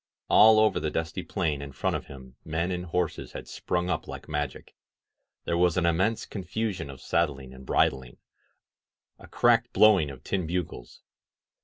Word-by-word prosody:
All 110 0 +7
over 110 0 +3
the 75 - -2
dusty 80 +1 -3
plain 75 -4 -2
in 70 -1 -8
front - - -1
of - - -5
him 65 -2 -12
men 85 +3 -2
and 90 0 -3
horses 90 -1 -2
had - - -8
sprung 90 0 -2
up 90 - -2
like - - -8
magic. 75 -1 -4 0.7
There 85 - 0
was 90 -1 +3
an 90 - +2
immense 95 +7 +1
con 100 - -6
fusion 105 -8 -3
of 65 -2 -9
saddling 70 -6 -1
and 65 0 -13
bridling 65 -3 +1 0.5
— - - -57
^a - - -14
cracked 120 0 +3
blowing 100 -9 +5
of 65 -2 -11
tin 95 -4 -2
bugles. 85 -8 -5
85 Hz, 175 wpm, -27 LUFS, 70-95 Hz, 0.7 s, All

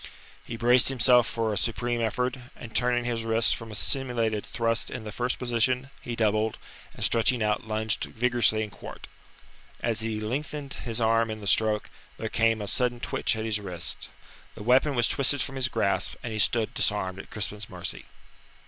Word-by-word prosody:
He 115 - -7
braced 120 +2 +6
himself 125 -2 +4
for 115 -2 -1
a - - -2
supreme 120 +1 -1
effort, 125 +4 -1 0.2
and 115 -2 -11
turning 120 0 +1
his 115 -2 -2
wrist 115 0 +4
from 115 -1 -9
a 105 - -6
simulated 115 -4 0
thrust 115 0 0
in 120 - -6
the 105 - -6
first 120 +4 -1
position, 125 +2 0
he 120 - -5
doubled, 110 -1 +1 0.4
and - - 0
stretching 115 +1 +3
out, 105 +1 -1
lunged 110 0 0
vigorously 120 -2 +2
in 105 - -7
quarte. - - -10 0.8
As 115 -1 +1
he 110 -1 -2
lengthened 140 +5 -4
his 115 -1 -5
arm 115 0 +2
in 110 0 -5
the 105 - -9
stroke 105 +1 +1 0.3
there 110 - -4
came 115 -1 +1
a - - -5
sudden 120 +3 +1
twitch 120 - 0
at 110 0 -4
his 110 -2 0
wrist; 90 -4 -3 0.5
the - - -8
weapon 130 +5 +3
was 120 -1 +3
twisted 140 +1 +2
from 135 - -6
his 130 -1 +1
grasp, 100 -6 0
and 115 - -4
he 110 - -3
stood 110 0 +2
disarmed 95 -3 -1
at - - -10
Crispin's 105 -1 -4
mercy. - - -4
115 Hz, 185 wpm, -27 LUFS, 110-125 Hz, 0.8 s, braced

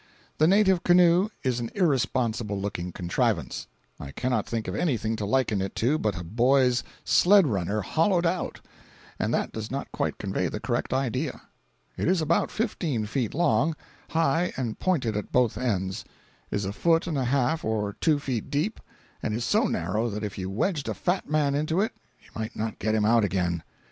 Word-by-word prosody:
The 155 - +5
native 190 -1 +4
canoe 175 +2 +5
is 125 -3 0
an 115 -1 -3
irresponsible 120 - 0
looking 90 -3 -4
contrivance. 90 0 -1 0.3
I 70 - -7
cannot 125 - -1
think 115 -2 -3
of - - -3
anything 115 -8 0
to 105 -2 -3
liken 110 -4 +1
it 95 - -4
to 140 +7 +1
but 105 - -1
a - - -6
boy's 125 +6 +3 0.2
sled 195 0 +6
runner 100 - -1
hollowed 170 - +1
out, 175 +1 -1 0.6
and - - 0
that - - 0
does 110 -1 -5
not 135 +1 -4
quite - - -2
convey 95 -2 -1
the 105 - -4
correct 120 +1 -2
idea. 130 +1 -1 0.5
It - - -1
is 185 0 +3
about 160 +2 +1
fifteen 170 - -1
feet 115 +2 -2
long, 155 -1 +2 0.3
high 165 +2 +1
and 120 -4 -3
pointed 135 - 0
at 105 - -4
both 125 -3 +3
ends, 95 -6 -2 0.5
is 100 -1 -1
a 95 - -3
foot 165 +6 +2
and 170 -3 -2
a 135 -2 0
half 135 +4 +1
or 105 -2 -1
two 155 -2 +4
feet 130 -6 -3
deep, 155 +10 -1 0.4
and 110 +2 -2
so - - +2
narrow 105 +8 -1
that 105 0 -5
if 105 -2 -4
you 95 -1 -4
wedged 140 - -1
a 110 - -2
fat 175 - -1
man 150 -2 +2
into 155 +4 0
it 215 +3 +1 0.3
you - - -21
might 110 0 -5
not 110 0 -3
get 110 +1 0
him 105 -1 +2
out 115 0 +4
again. 90 -3 0
125 Hz, 185 wpm, -26 LUFS, 105-160 Hz, 0.6 s, sled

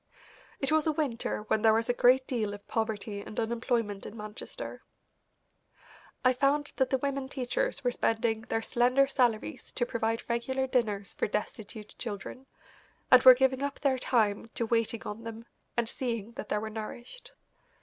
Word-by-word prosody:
It 275 - 0
was 315 0 +3
a - - +4
winter 275 -8 -2
when 215 0 0
there 220 -1 +5
was 225 0 +1
a 245 - +2
great 255 +2 +5
deal 220 -6 -2
of 205 - -15
poverty 215 -2 -2
and 210 - -6
unemployment 230 -3 -1
in 225 - -8
Manchester. 210 0 -7 1.4
I 255 - +6
found 285 +3 +1
that 265 -2 +2
the 265 - +2
women 275 0 -2
teachers 265 +1 -2
were 245 - +2
spending 225 -1 0
their 225 0 -2
slender 250 +3 +3
salaries 245 -5 0
to 240 - 0
provide 225 -1 -2
regular 260 +3 0
dinners 215 -6 0
for - - -1
destitute 210 +1 -5
children, 235 +4 -6 0.6
and 255 -1 +9
were 255 0 +10
giving 260 +1 +2
up 280 0 -3
their 265 -3 +1
time 220 -3 +1
to 230 - 0
waiting 230 0 0
on 210 +2 -6
them 230 0 -7 0.3
and 235 -1 +2
seeing 230 -3 -3
that 220 - -7
they - - +1
were 220 +1 -4
nourished. 240 - -8
235 Hz, 170 wpm, -30 LUFS, 220-260 Hz, 1.4 s, were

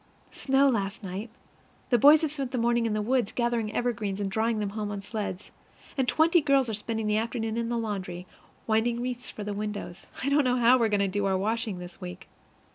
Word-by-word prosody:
Snow 270 0 +2
last 210 -4 -1
night. 195 +5 -5 0.6
The 240 - +5
boys 295 +6 +7
have 310 - 0
spent 275 -4 -3
the 255 - -3
morning 235 0 +2
in 220 - -1
the 215 0 -1
woods, 240 -1 +1
gathering 235 -3 -1
evergreens 220 -5 -2
and 200 -1 -2
drawing 225 +2 +1
them 210 -1 -1
home 210 0 -3
on 200 -1 -5
sleds; 205 -3 -5 0.4
and 265 -2 0
twenty 330 +5 +4
girls 275 -3 +3
are - - -2
spending 220 +1 -3
the 210 0 +2
afternoon 225 0 -2
in 230 0 -1
the 240 - -1
laundry, 185 -5 -4 0.4
winding 230 +2 +1
wreaths 245 0 -4
for 210 - -7
the 205 0 -3
windows. 205 -3 -5 0.2
I 275 - +1
don't 285 +1 +4
know 250 -1 +2
how 245 +1 +5
we 230 - +3
are - - -3
going 205 -1 +2
to 200 - +2
do 200 +1 -1
our 190 -1 +2
washing 220 0 -1
this 180 0 -10
week. 180 0 -8
225 Hz, 225 wpm, -27 LUFS, 205-245 Hz, 0.6 s, boys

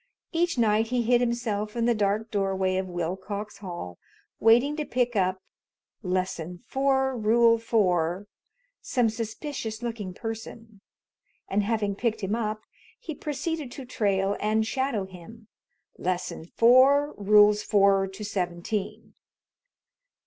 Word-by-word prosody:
Each 340 -2 0
night 220 -1 +3
he 245 0 0
hid 240 +1 +3
himself 230 -3 -2
in 235 -1 0
the 240 - +3
dark 210 +1 0
doorway 190 -2 0
of 190 0 -2
Willcox 190 +4 -4
Hall 175 - -7 0.4
waiting 240 +6 +4
to 305 - -1
pick 245 -4 -1
up 185 -1 0 0.6
(Lesson 180 -2 -2
Four, 265 -1 +1
Rule 230 +1 +4
Four) 185 -5 +1 0.6
some 245 -4 +1
suspicious 225 0 -5
looking 215 -6 -5
person, 225 -1 -8 0.7
and 200 +2 +1
having 205 -1 0
picked 225 0 -1
him 195 +1 -2
up, 215 -1 -2 0.4
he 315 - -6
proceeded 295 0 -4
to 270 - -8
trail 200 -4 0
and 215 +1 +1
shadow 260 -4 -1
him 190 +5 -13 0.5
(Lesson 180 -2 -3
Four, 260 - +5
Rules 210 +1 +5
Four 195 -1 +3
to 195 +2 -8
Seventeen). 200 +3 -3
215 Hz, 125 wpm, -26 LUFS, 195-235 Hz, 0.7 s, Four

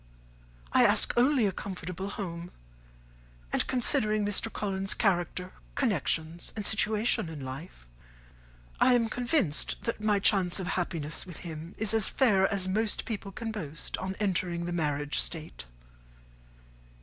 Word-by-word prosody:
I - - +6
ask - - +4
only 255 -1 +4
a 200 - +2
comfortable 185 0 -5
home; 175 -4 -5 1.0
and, - - +1
considering 225 -5 +2
Mr. 205 +2 0
Collins's 195 -2 0
character, 180 -2 0 0.2
connections, 170 - 0
and 210 -2 -4
situation 215 -4 +2
in 150 -4 -7
life, 130 - -8 0.9
I 255 -1 +6
am 230 -2 +2
convinced 245 - 0
that 230 -2 -3
my 210 -1 +2
chance 195 -3 +3
of 190 - -3
happiness 165 -3 -2
with 175 - -8
him 160 +1 -7
is 220 -1 +1
as 220 -3 +2
fair 205 -8 +3
as 195 -2 0
most 215 +3 0
people 205 -4 -4
can 225 +3 -5
boast 165 -8 -4
on 190 0 -3
entering 180 -4 0
the 175 - -3
marriage 145 -3 0
state." 160 - -3
190 Hz, 135 wpm, -29 LUFS, 170-215 Hz, 1.0 s, I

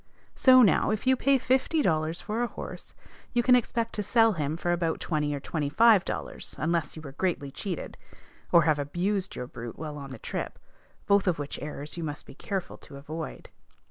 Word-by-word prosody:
So 255 -1 +7
now, 205 - +4
if 215 +2 -1
you 260 0 +5
pay 275 +2 +3
fifty 265 +5 +1
dollars 160 -2 +1
for 220 +3 -2
a 240 - +1
horse, - - -9 0.4
you 240 -1 +2
can 250 0 +6
expect 230 -1 0
to 210 - -2
sell 225 +2 +4
him 155 -2 -2
for 175 0 -1
about 170 -2 0
twenty 150 -3 -1
or - - -4
twenty 145 +1 -3
five 220 +2 +6
dollars, - - -4
unless 165 -2 -1
you 155 - -9
were 140 - -8
greatly 145 -3 -2
cheated, 180 +2 -5 0.5
or 170 -2 +7
have 155 -2 +2
abused 180 +7 -1
your 125 - -4
brute 120 -1 -8
while 150 -1 -6
on 140 -1 -8
the 130 - -8
trip, - - -5 0.5
both 200 -1 +3
of 180 - +2
which 145 0 -5
errors 150 +1 -6
you 170 - -3
must 150 -1 -5
be - - -12
careful 195 -3 -4
to 140 - -12
avoid. 155 +3 -7
170 Hz, 205 wpm, -28 LUFS, 150-215 Hz, 0.5 s, So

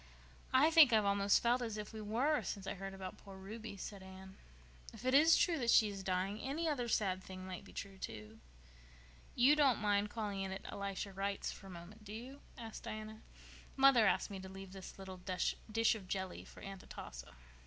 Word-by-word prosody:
"I 285 +5 +5
think 315 -6 +9
I've 215 -2 +4
almost 200 0 +3
felt 240 +1 +3
as 225 -3 -3
if 210 0 -6
we 220 - -6
were 250 +9 +1
since 200 -2 -5
I - - -2
heard 195 0 -6
about 190 -1 -7
poor 195 -1 -11
Ruby," 210 +2 -7
said 195 +1 -7
Anne. 190 0 -11 0.6
"If 225 +2 -11
it 255 - +2
is 315 +4 +7
true 335 -3 +2
that 240 -2 0
she 220 -2 +6
is 200 -1 -6
dying 190 +2 -1
any 305 +7 -2
other 265 -6 0
sad 190 -5 +1
thing 185 0 -8
might 185 -1 -6
be - - -14
true, 195 -1 -7
too." 110 - -7 1.0
"You 260 +5 +6
don't 280 -6 +4
mind 205 -1 +1
calling 205 -3 -3
in 190 0 -3
at 190 - -6
Elisha 200 0 -4
Wright's 195 +1 -2
for 195 - -11
a - - -10
moment, 185 +5 -11
do 210 0 -8
you?" 255 +5 -8 0.2
asked 225 -3 -7
Diana. 215 -1 -7 0.6
"Mother 265 -5 +7
asked - - +1
me 195 - -5
to 190 0 -8
leave 195 0 -9
this 190 -1 -9
little 190 -1 -8
dish 180 0 -1 0.4
of 205 -5 -8
jelly 190 -1 -4
for - - -13
Aunt 195 -1 -7
Atossa." - - -9
200 Hz, 205 wpm, -36 LUFS, 190-230 Hz, 1.0 s, think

